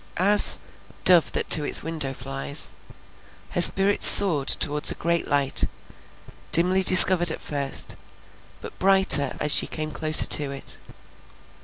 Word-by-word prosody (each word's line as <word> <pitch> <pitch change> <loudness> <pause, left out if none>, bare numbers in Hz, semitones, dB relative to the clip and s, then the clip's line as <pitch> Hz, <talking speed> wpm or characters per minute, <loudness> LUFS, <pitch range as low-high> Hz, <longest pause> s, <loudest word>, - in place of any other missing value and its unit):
As 205 +3 +1 0.5
"dove 175 -3 +3
that - - -6
to 155 - +3
its - - +2
window 155 -4 -5
flies," 135 +3 -3 0.8
her 175 - -3
spirit 195 +3 +2
soared 160 -9 +5
towards 150 0 +1
a - - -1
great 170 0 -5
light, 140 -2 -1 0.9
dimly 185 +3 +1
discovered 185 -1 +5
at 160 - -8
first, 140 -2 -5 0.7
but - - -14
brighter 190 -8 0
as 150 - -4
she - - 0
came 155 -1 -8
closer 155 0 +1
to 145 -2 0
it. 140 0 -5
155 Hz, 135 wpm, -20 LUFS, 145-185 Hz, 0.9 s, soared